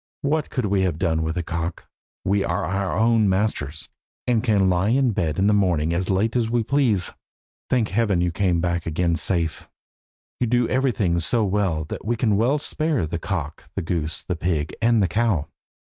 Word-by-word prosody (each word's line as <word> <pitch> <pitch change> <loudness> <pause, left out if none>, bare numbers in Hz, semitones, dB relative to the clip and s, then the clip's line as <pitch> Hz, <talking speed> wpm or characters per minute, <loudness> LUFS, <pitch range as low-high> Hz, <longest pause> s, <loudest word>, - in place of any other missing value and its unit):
What 150 +1 0
could 125 - -2
we 100 -1 +1
have 90 -4 0
done 80 -2 0
with 80 +2 -2
a 85 - -1
cock? 85 0 -4 0.4
We 100 +1 +2
are 90 -1 -1
our 95 +2 -1
own 110 -2 +3
masters, 95 -6 -1 0.4
and 120 -2 +1
can 105 -6 +3
lie 90 +2 +2
in 130 0 +3
bed 85 -8 -1
in 95 - +2
the 105 - +4
morning 85 -6 +2
as 90 +2 -1
late 100 +5 +1
as 115 -2 +1
we 120 0 +1
please. 115 -8 +1 0.6
Thank 120 -4 +1
Heaven 105 -3 +1
you 90 0 +1
have - - -7
come 90 -2 +1
back 85 -1 -1
again 85 +1 +1
safe. 85 -2 0 0.7
You 125 - +1
do 120 0 +2
everything 115 -10 +1
so 105 +8 +1
well 95 -5 0
that - - -7
we 120 +3 0
can 115 -3 +1
well 120 +8 +2
spare 150 - -1
the 85 +2 -4
cock, 80 -5 -5
the - - -2
goose, 80 -1 -2
the 90 - -3
pig, 80 -3 -1
and 115 -2 +4
the - - +2
cow." 95 -4 +1
95 Hz, 200 wpm, -23 LUFS, 85-115 Hz, 0.7 s, the